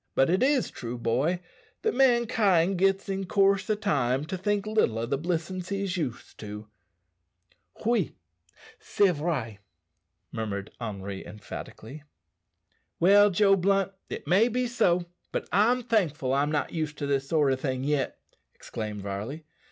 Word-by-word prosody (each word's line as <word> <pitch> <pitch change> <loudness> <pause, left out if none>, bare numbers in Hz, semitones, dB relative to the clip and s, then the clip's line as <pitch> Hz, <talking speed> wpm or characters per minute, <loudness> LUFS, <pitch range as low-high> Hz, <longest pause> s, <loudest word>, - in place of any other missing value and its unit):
But 135 +4 +3
it 185 - +2
is 270 -1 +2
true, 120 0 -6
boy, 130 +10 0 0.4
that 445 - +1
mankind 225 -8 +3
gits 195 +1 +2
in 195 -1 -3
coorse 195 +1 +2
o' 215 - +3
time 140 - 0
to 185 +4 -4
think 205 +2 -1
little 215 - +1
o' 115 - -1
the 135 +4 -1
blissin's 175 +4 -3
he's 195 -2 -2
used 145 -9 -5
to." 105 0 -8 1.2
"Oui, 225 -7 +1 0.6
c'est 200 -2 +2
vrai!" 140 - -3 0.7
murmured 105 -3 -4
Henri 100 -3 -5
emphatically. 110 +5 -9 1.0
"Well, 205 +4 +6
Joe 195 +1 +4
Blunt, 195 +1 +1 0.2
it - - -6
may 200 +6 +4
be 250 +1 0
so, 180 -8 +2 0.3
but - - -3
I'm 240 +5 +3
thankful 165 - 0
I'm 145 +2 +1
not 150 -2 -1
used 155 -3 -3
to 145 - -3
this 135 -1 -1
sort 150 -4 +3
o' - - +1
thing 130 -1 -3
yet," 145 -1 -1 0.4
exclaimed 105 -2 -6
Varley. 105 +11 -5
170 Hz, 145 wpm, -27 LUFS, 130-200 Hz, 1.2 s, Well